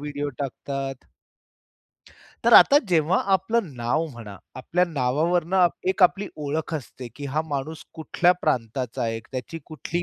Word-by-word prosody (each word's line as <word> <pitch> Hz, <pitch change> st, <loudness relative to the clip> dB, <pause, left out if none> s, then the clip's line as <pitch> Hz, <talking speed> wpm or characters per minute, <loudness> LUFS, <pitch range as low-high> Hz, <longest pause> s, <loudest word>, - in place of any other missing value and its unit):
Video 145 Hz, 0 st, -4 dB
टाकतात. 135 Hz, -1 st, -5 dB, 1.4 s
तर -, -, +4 dB
आता 285 Hz, -, +8 dB
जेव्हा 170 Hz, 0 st, +2 dB, 0.2 s
आपलं 195 Hz, +4 st, +1 dB
नाव 120 Hz, +7 st, 0 dB
म्हणा. 115 Hz, -8 st, -10 dB, 0.2 s
आपल्या 170 Hz, +8 st, 0 dB
नावावरून 160 Hz, +3 st, 0 dB
आप 180 Hz, -2 st, +4 dB, 0.2 s
एक 190 Hz, 0 st, +1 dB
आपली 195 Hz, +3 st, +4 dB
ओळख 155 Hz, +2 st, -3 dB
असते 130 Hz, -3 st, -7 dB
की 145 Hz, -, -7 dB
हा 150 Hz, +3 st, -1 dB
माणूस 150 Hz, +2 st, -4 dB
कुठल्या 165 Hz, +2 st, +2 dB
प्रांताचा 125 Hz, -3 st, -2 dB
आहे 115 Hz, -1 st, -1 dB
एक, 115 Hz, -, -10 dB
त्याची 130 Hz, +5 st, -5 dB
कुठली 165 Hz, +2 st, -4 dB
150 Hz, 145 wpm, -24 LUFS, 130-175 Hz, 1.4 s, आता